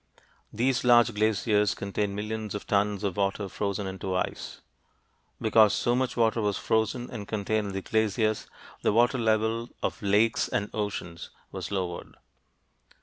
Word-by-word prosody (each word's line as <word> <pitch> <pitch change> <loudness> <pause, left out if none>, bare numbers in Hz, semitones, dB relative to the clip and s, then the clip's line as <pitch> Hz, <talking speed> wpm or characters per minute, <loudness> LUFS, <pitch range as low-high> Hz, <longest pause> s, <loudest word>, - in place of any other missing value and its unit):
These 120 +2 +1
large 120 -1 +5
glaciers 105 0 +2
contained 100 0 -2
millions 105 0 -4
of 105 - -5
tons 100 0 +1
of 100 -2 -2
water 100 0 0
frozen 100 +1 -3
into 95 0 -4
ice. 90 - -3 0.8
Because 110 -1 +5
so 120 - +1
much 125 -1 -1
water 115 0 +2
was 105 -1 0
frozen 110 +3 0
and 105 -4 -6
contained 110 0 -1
in 100 - -5
the 95 0 -4
glaciers, 110 0 0 0.3
the - - +2
water 120 +3 +3
level 110 +1 +1
of - - -2
lakes 105 +3 +2
and 105 - -2
oceans 100 -5 -4 0.2
was - - -5
lowered. 90 -3 -4
105 Hz, 145 wpm, -27 LUFS, 100-110 Hz, 0.8 s, large